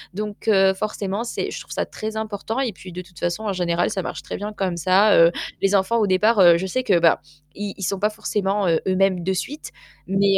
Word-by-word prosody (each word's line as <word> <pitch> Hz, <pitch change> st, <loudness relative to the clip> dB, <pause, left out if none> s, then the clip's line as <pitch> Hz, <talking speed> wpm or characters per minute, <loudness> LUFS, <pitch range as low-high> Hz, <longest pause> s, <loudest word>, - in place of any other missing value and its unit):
Donc 210 Hz, +1 st, -6 dB
heu, 195 Hz, -3 st, +5 dB
forcément, 205 Hz, +1 st, -3 dB
c'est 235 Hz, -, -4 dB
je -, -, -5 dB
trouve -, -, -12 dB
ça -, -, -1 dB
très 220 Hz, 0 st, -6 dB
important 220 Hz, +2 st, -4 dB
et 245 Hz, -7 st, -1 dB
puis 185 Hz, 0 st, -11 dB
de 180 Hz, +1 st, -6 dB
toute 175 Hz, -1 st, -16 dB
façon, 175 Hz, +5 st, -2 dB
en 205 Hz, -2 st, -1 dB
général, 175 Hz, -1 st, 0 dB
ça 190 Hz, -, -2 dB
marche -, -, -6 dB
très -, -, -6 dB
bien 210 Hz, +1 st, -5 dB
comme 190 Hz, -4 st, -2 dB
ça. 185 Hz, +5 st, +4 dB
Heu, 165 Hz, +1 st, +6 dB, 0.3 s
les 195 Hz, +1 st, +3 dB
enfants, 200 Hz, +4 st, +2 dB
au 210 Hz, -, +2 dB
départ, 210 Hz, +4 st, +3 dB
heu, 175 Hz, -2 st, +7 dB
je 190 Hz, -, -3 dB
sais 255 Hz, +7 st, -1 dB
que, 200 Hz, -8 st, +3 dB
bah, 165 Hz, -1 st, +3 dB, 0.3 s
i 205 Hz, -1 st, -5 dB
ils 195 Hz, -, -6 dB
sont 195 Hz, +2 st, -1 dB
pas 210 Hz, +2 st, +2 dB
forcément, 205 Hz, -2 st, -1 dB
heu, 165 Hz, -1 st, +3 dB
eux-mêmes 185 Hz, -1 st, +2 dB
de 190 Hz, -, 0 dB
suite 285 Hz, -, -5 dB, 0.4 s
mais 195 Hz, 0 st, +3 dB
195 Hz, 245 wpm, -22 LUFS, 185-210 Hz, 0.4 s, heu